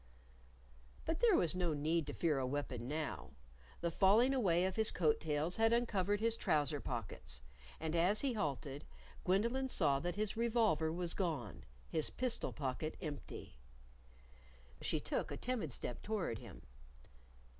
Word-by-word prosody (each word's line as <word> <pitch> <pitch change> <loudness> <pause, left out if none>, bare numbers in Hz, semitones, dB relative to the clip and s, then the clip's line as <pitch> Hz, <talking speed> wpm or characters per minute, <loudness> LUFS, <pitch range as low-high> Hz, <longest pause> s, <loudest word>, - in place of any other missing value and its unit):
_" - - -20
But 325 0 -1
there 460 -5 +5
was 170 - +2
no 175 -4 0
need 155 +1 0
to 145 - -4
fear 155 -5 +1
a 130 - -1
weapon 130 -3 -3
now. 155 +1 -4 0.5
The 170 0 0
falling 215 +9 +5
away 185 -9 +3
of 190 - -1
his 220 -1 +3
coat 155 -4 +2
tails 155 +2 -1
had 225 0 +4
uncovered 205 -4 +1
his 230 +1 +2
trouser 150 -4 +3
pockets. 95 - -5 0.4
And 160 +1 -2
as 185 +6 +4
he 275 -3 +1
halted, 140 - -3 0.4
Gwendolyn 235 +8 +2
saw 145 - +3
that 175 +4 -2
his 210 0 -1
revolver 220 -9 +2
was 175 0 -1
gone, 150 - -3 0.2
his 155 - 0
pistol 255 -2 0
pocket 145 +3 -3
empty. 145 - -7 1.2
She - - 0
took - - -2
a - - -4
timid 230 - -2
step 120 - -4
toward 195 - -2
him. - - -11
170 Hz, 155 wpm, -37 LUFS, 145-220 Hz, 1.2 s, there